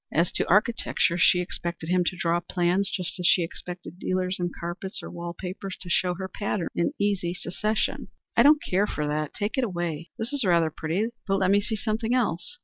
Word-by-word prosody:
As 165 +3 +2
to - - 0
architecture, 205 -4 +3
she 180 +1 +5
expected 170 -2 -4
him 180 0 +3
to 180 - -1
draw 170 +1 +1
plans 175 +2 +1
just 180 0 -4
as 180 - +2
she 180 - +5
expected 175 +1 -7
dealers 185 0 -1
in 175 0 0
carpets 175 +3 -5
or - - -7
wall 170 0 -6
papers 190 +1 -5
to 175 - -7
show 180 0 +2
her 190 +1 -4
patterns 195 -1 -2
in 170 - 0
easy 195 -4 0
succession. 210 +5 -1 0.3
"I - - +6
don't 300 +1 +6
care 195 +3 +1
for 150 - -2
that; 150 0 -2
take 210 +5 -1
it - - +2
away." 175 -6 -3
"That 225 +5 -3
is 280 -3 +3
rather 170 -4 +3
pretty, 175 +10 -1 0.2
but 195 -1 +2
let 190 -1 +2
me 205 0 +5
see 220 +2 -1
something 225 +2 0
else." 250 - -1
180 Hz, 210 wpm, -26 LUFS, 170-205 Hz, 0.3 s, I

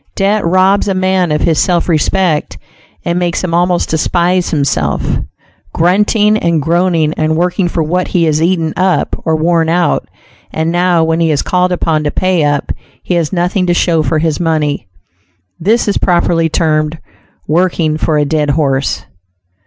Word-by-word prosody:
Debt 205 +1 +1
robs 185 +4 +2
a 195 - 0
man 185 -2 +1
of 150 - 0
his 160 -2 +1
self 175 -2 +1
respect, 170 0 0 0.5
and 175 +1 0
makes 175 0 -1
him 175 -2 -2
almost 175 +1 +1
despise 175 +3 0
himself. 105 - -1 0.7
Grunting 210 +5 +2
and 170 -4 +1
groaning 165 0 +1
and 155 0 0
working 180 +2 0
for 165 -1 -1
what 180 +4 -1
he 175 - 0
has 155 -1 +1
eaten 165 -2 0
up 185 0 0
or 160 - +1
worn 165 0 +1
out, 175 +1 0 0.4
and 160 +1 -1
now 175 -1 +2
when 160 0 0
he 165 -1 +2
is 150 -3 0
called 180 0 0
upon 160 -3 0
to 150 - 0
pay 185 0 0
up, 145 -1 -1 0.3
he - - -2
has 170 -3 0
nothing 180 +1 0
to 175 - +2
show 165 -2 +2
for 155 +1 0
his 155 -1 -1
money; 155 - -1 0.7
this 215 +8 +1
is 205 - 0
properly 170 -2 +1
termed 155 -1 0 0.5
"working 165 -1 +1
for 155 0 0
a 150 - +2
dead 150 0 0
horse." 140 -2 0
170 Hz, 170 wpm, -13 LUFS, 155-180 Hz, 0.7 s, robs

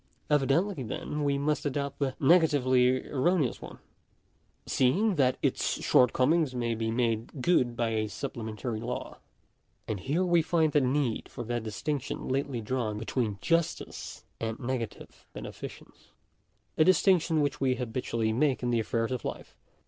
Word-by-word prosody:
Evidently, 150 +5 +2
then, 150 +5 -4
we 140 -1 +1
must 150 +2 0
adopt 140 -1 -3
the 135 -2 -1
negatively 130 -5 +4
erroneous 145 0 +1
one, - - -9 0.9
seeing 190 - +2
that 130 -6 +2
its - - 0
shortcomings 130 +3 +3
may 120 -1 0
be 110 0 -2
made 115 +2 -1
good 125 -5 +2
by 115 -1 0
a 110 -1 0
supplementary 110 -1 -5
law. 120 +2 -5 0.7
And 105 -3 -2
here 150 - 0
we 175 -2 +4
find 160 -1 +2
the 145 - +3
need 130 -2 0
for 120 - -6
that 120 +1 -2
distinction 125 +6 -4
lately 135 -2 -1
drawn 110 -2 -2
between 110 -1 -2
justice 165 -1 -2 0.2
and 115 -1 -3
negative 120 -3 -5
beneficence - - -9 0.3
— - - -44
a - - +8
distinction 180 -3 +4
which 145 -2 -1
we 130 -1 +2
habitually 115 -2 -2
make 130 +1 +1
in 120 - 0
the 120 - +2
affairs 115 +2 -1
of 125 -3 -3
life. - - -6
130 Hz, 150 wpm, -29 LUFS, 115-150 Hz, 0.9 s, a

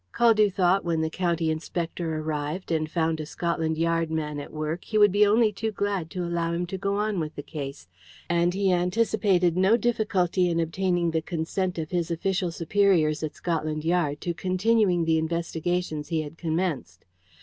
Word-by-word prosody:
Caldew 220 -3 +4
thought 185 +1 +2
when 165 -2 0
the 160 0 -1
county 170 -2 0
inspector 165 0 -3
arrived 155 +3 -3
and 155 -1 0
found 160 -1 0
a 155 - -4
Scotland 165 -2 -1
Yard 165 0 +1
man 150 -2 -3
at 145 - -8
work 155 +3 -3
he 215 - -1
would 205 -2 +6
be 205 +2 +4
only 215 +1 +4
too 220 +2 -2
glad 200 -5 -2
to 180 0 -4
allow 170 -1 -1
him 175 +1 -1
to 190 +2 -5
go 200 +1 -1
on 210 -2 0
with 155 -1 -4
the 145 - -6
case, 140 - -7 0.4
and 175 +1 +1
he 195 -1 +2
anticipated 180 -1 +2
no 190 +5 +4
difficulty 195 -6 +1
in 170 -1 0
obtaining 175 +1 0
the 160 0 0
consent 175 +2 -2
of 160 -1 -4
his 175 -2 -1
official 180 +2 -1
superiors 165 -3 +2
at 155 -2 -4
Scotland 155 -2 -2
Yard 165 -4 +1
to 175 - -2
continuing 185 0 +2
the 160 0 +3
investigations 165 -1 -2
he 160 -1 -1
had 150 +1 -9
commenced. 160 - -3
170 Hz, 180 wpm, -26 LUFS, 160-190 Hz, 0.4 s, would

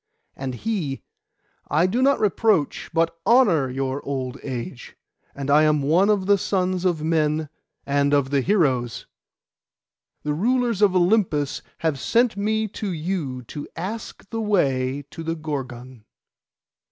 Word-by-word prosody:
And 130 -2 -4
he, 170 - -3 0.7
'I 155 +4 +3
do 225 +7 0
not 275 +1 +4
reproach, 210 - +1
but 165 0 0
honour 190 - +4
your 135 +2 -3
old 130 -1 -4
age, 125 -2 -6 0.4
and 140 0 -3
I 150 +2 +6
am 150 -2 +3
one 170 +8 +3
of 205 -3 +2
the 200 0 +4
sons 185 -1 0
of 170 -4 +1
men 155 -1 +1 0.4
and 140 0 +1
of 140 -2 +2
the 140 -1 +3
heroes. 130 - +1 1.2
The 150 - -1
rulers 235 +4 +1
of 200 -3 +4
Olympus 175 -6 +2 0.2
have 150 -4 +1
sent 230 - +2
me 220 +2 0
to 205 0 -4
you 155 -7 -3
to 145 +5 -7
ask 200 +5 -6
the 225 -1 -2
way 140 -10 +1
to - - -8
the 165 0 -2
Gorgon. 130 -6 -6
160 Hz, 140 wpm, -23 LUFS, 140-200 Hz, 1.2 s, I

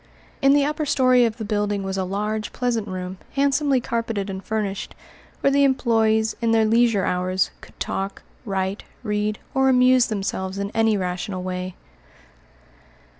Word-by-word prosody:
In 275 +1 +5
the 285 -1 +4
upper 300 +1 -2
story 255 -3 +4
of 225 -1 -2
the 220 - -5
building 205 -1 -1
was 190 0 -3
a 190 - -1
large, 210 +3 -2
pleasant 235 -4 -1
room, 185 0 -5
handsomely 280 -1 +2
carpeted 230 -4 -2
and 190 0 -6
furnished, 210 -3 -3 0.5
where 275 - +3
the 280 0 +4
employés, 225 -5 +2
in 230 - +1
their 225 -1 +4
leisure 225 -3 +3
hours, 185 +1 0
could - - -16
talk, 195 +1 -3 0.2
write, 195 -2 -2 0.2
read, 210 -1 -1 0.2
or 265 -1 +3
amuse 255 -1 +5
themselves 195 -3 -3
in 200 0 -3
any 225 -1 +3
rational 185 0 -3
way. 185 0 -4
215 Hz, 155 wpm, -23 LUFS, 195-245 Hz, 0.5 s, In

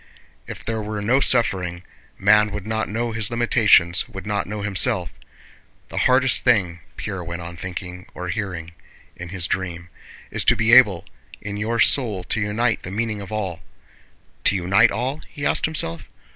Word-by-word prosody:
If - - -9
there 110 -1 -2
were 105 0 -4
no 115 +6 +2
suffering, 95 -10 +1 0.3
man 105 +2 +4
would 105 -1 -6
not 110 0 -2
know 115 +2 -2
his 110 -1 -1
limitations, 115 -7 +3
would 95 -4 -8
not 105 -1 -2
know 105 0 -5
himself. 100 -1 +1 0.8
The - - -3
hardest 130 0 +3
thing 95 -8 +2 0.2
(Pierre 95 -4 -5
went 85 0 -6
on 85 0 -8
thinking, 90 +1 -7
or 90 0 -5
hearing, 90 -4 -4 0.4
in 85 0 -8
his 90 -2 0
dream) 90 -2 -4 0.4
is - - +1
to - - +6
be 110 +1 +2
able 105 -9 +6 0.3
in 100 -1 -6
your 110 +3 -2
soul 105 -4 +3
to 100 - -1
unite 110 +3 0
the - - -7
meaning 105 +1 -2
of 100 - -9
all. 95 -6 -3 0.8
To - - +5
unite 100 +5 +4
all?" 130 +8 -3
he 145 - -6
asked - - +1
himself. 85 - -3
105 Hz, 170 wpm, -22 LUFS, 90-115 Hz, 0.8 s, to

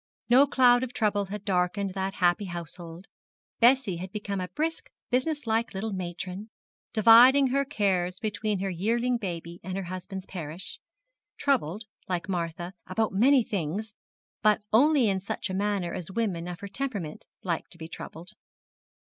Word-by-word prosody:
No 270 +4 +7
cloud 245 -3 +5
of 255 -1 -4
trouble 205 -2 +1
had 205 +1 -7
darkened 190 +1 0
that 190 +1 -3
happy 180 +3 +2
household. 175 0 -7 0.5
Bessie 240 -6 +4
had 185 +2 -6
become 205 -2 -3
a 180 - -3
brisk, 320 - -3 0.2
business 290 +3 0
like 225 -1 0
little 210 +2 -3
matron, 185 +3 -5 0.4
dividing 245 +5 +7
her 275 +2 +2
cares 190 -9 0
between 210 -2 -2
her 195 - -1
yearling 235 +7 +1
baby 170 -5 -5
and 185 0 -4
her 195 - -2
husband's 185 +1 -6
parish; 170 -1 -6 0.6
troubled, 225 - 0 0.3
like 180 -2 -2
Martha, 175 -1 -3
about 220 +3 0
many 255 +6 +5
things, 200 +2 -3 0.5
but 215 -1 +3
only 275 +1 +5
in 195 -2 +1
such 195 +1 -4
a - - -3
manner 195 -3 -1
as 180 -1 -5
women 190 -5 -2
of 175 -1 -6
her 200 - -5
temperament 200 - -4 0.2
like 170 -3 -2
to 170 - -9
be 160 -1 -7
troubled. 170 +2 -8
200 Hz, 155 wpm, -28 LUFS, 180-230 Hz, 0.6 s, No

